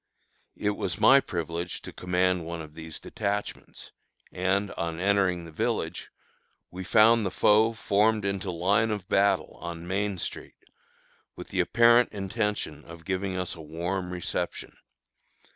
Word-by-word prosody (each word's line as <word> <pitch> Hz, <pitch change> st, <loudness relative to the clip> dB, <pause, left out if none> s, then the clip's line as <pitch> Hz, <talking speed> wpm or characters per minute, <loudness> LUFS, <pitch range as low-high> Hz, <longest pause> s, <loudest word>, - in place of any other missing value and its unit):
It 105 Hz, -, 0 dB
was 95 Hz, -2 st, -3 dB
my 135 Hz, +5 st, +7 dB
privilege 85 Hz, -, -4 dB
to -, -, -9 dB
command 90 Hz, 0 st, 0 dB
one 85 Hz, 0 st, -5 dB
of 75 Hz, -2 st, -9 dB
these 80 Hz, 0 st, -8 dB
detachments; 105 Hz, -1 st, -4 dB, 0.4 s
and, 95 Hz, +2 st, 0 dB
on 85 Hz, 0 st, -4 dB
entering 95 Hz, -3 st, +1 dB
the 85 Hz, -, -10 dB
village, 75 Hz, -, -2 dB, 0.6 s
we 95 Hz, +1 st, -6 dB
found 115 Hz, +3 st, +5 dB
the 95 Hz, -, 0 dB
foe 110 Hz, +4 st, +4 dB
formed 105 Hz, 0 st, +2 dB
into 100 Hz, -1 st, -2 dB
line 100 Hz, +6 st, +2 dB
of 105 Hz, -4 st, -3 dB
battle 100 Hz, +1 st, +1 dB
on 85 Hz, 0 st, -6 dB
Main 100 Hz, +1 st, -1 dB
street, -, -, -6 dB, 0.8 s
with -, -, -9 dB
the -, -, -3 dB
apparent 120 Hz, +1 st, +5 dB
intention 105 Hz, -6 st, -3 dB
of 85 Hz, -1 st, -12 dB
giving 95 Hz, +1 st, -2 dB
us 90 Hz, -1 st, -3 dB
a 80 Hz, -, -10 dB
warm 85 Hz, +4 st, -3 dB
reception. 90 Hz, -2 st, -4 dB
95 Hz, 145 wpm, -27 LUFS, 85-105 Hz, 0.8 s, my